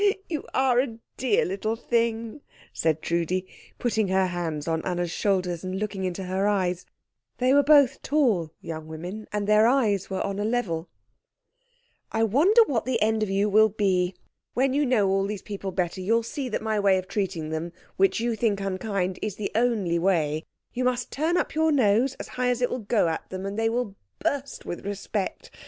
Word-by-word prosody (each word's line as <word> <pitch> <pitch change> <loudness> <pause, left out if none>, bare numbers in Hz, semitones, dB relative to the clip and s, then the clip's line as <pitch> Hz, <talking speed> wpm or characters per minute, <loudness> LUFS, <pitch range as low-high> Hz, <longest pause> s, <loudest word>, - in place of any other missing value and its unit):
"Oh, 405 -1 +5
you 310 -4 -3
are 260 -2 +3
a 245 -4 -1 0.2
dear 245 -5 +2
little 200 +4 -2
thing!" 230 +2 -1 0.3
said 160 -1 0
Trudi, 170 +2 0 0.3
putting 220 -4 0
her 190 0 +2
hands 170 -5 -3
on 160 0 0
Anna's 175 -2 -2
shoulders 180 -3 0
and 185 0 -3
looking 200 -2 -3
into 185 +1 -3
her 190 +2 0
eyes 185 -3 0 0.5
they 255 +1 +3
were 285 - +6
both 285 -3 +5
tall 230 - +1
young 160 -1 -6
women, 175 +7 -7
and 210 -1 -1
their 210 +2 +5
eyes 220 -7 +2
were 190 -1 -2
on 200 0 -3
a - - 0
level 200 -8 -1 1.2
"I 225 - +1
wonder 330 - +5
what 245 - -1
the 250 -2 0
end 220 0 +2
of 215 - 0
you 195 +2 +2
will 215 +1 +5
be. 190 -3 +1 0.4
When 260 +1 +2
you 290 0 +2
know 225 -6 +3
all 195 +1 +1
these 205 -2 -5
people 200 -2 -5
better 180 0 -2
you'll 225 +5 +2
see 260 +3 -4
that 215 - -3
my 220 -1 0
way 195 -2 +4
of 185 0 -4
treating 185 -7 -2
them, 160 +2 -3 0.2
which 195 +3 +3
you 235 0 0
think 215 -2 +1
unkind, 190 -1 -2
is 210 -3 -3
the 210 - -4
only 215 -7 +1
way. 160 -4 +1 0.3
You 255 - -1
must 250 -1 0
turn 320 +5 +1
up - - -1
your 320 0 +2
nose 255 0 +3
as - - -8
high 250 0 -1
as 250 0 0
it 245 - +1
will 250 - -2
go 210 -3 +1
at 160 - -3
them, 185 +1 -5
and 200 +1 -4
they 225 +1 +1
will 235 -3 -2 0.2
burst 280 0 -3
with 175 - -5
respect. 200 0 -4
205 Hz, 200 wpm, -26 LUFS, 185-240 Hz, 1.2 s, were